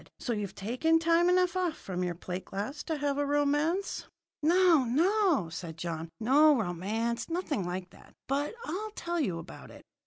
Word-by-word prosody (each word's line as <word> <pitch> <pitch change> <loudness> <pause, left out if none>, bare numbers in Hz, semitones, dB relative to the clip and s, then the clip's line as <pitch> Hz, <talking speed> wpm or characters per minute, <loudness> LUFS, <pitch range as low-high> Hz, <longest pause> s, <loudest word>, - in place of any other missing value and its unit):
"So 240 - -2
you've 205 -3 -4
taken 255 +11 +2
time 335 +2 +3
enough 360 0 +3
off 360 -4 0
from 180 -1 -4
your 175 -1 -2
plate 180 +2 -6
glass 235 +10 -4
to 320 -2 -2
have 285 -1 -1
a - - +2
romance?" 290 +6 0 0.3
"No, 340 -2 +5
no," 330 - +2
said 165 0 -7
John. 165 -1 -4
"No 285 +6 +5
romance 220 - -2
nothing 320 - -2
like 180 0 -5
that! - - -18
But 285 +8 -1
I'll 420 +6 -4
tell 345 0 -2
you 190 - 0
about 165 - -10
it. - - -13
285 Hz, 175 wpm, -30 LUFS, -, 0.3 s, No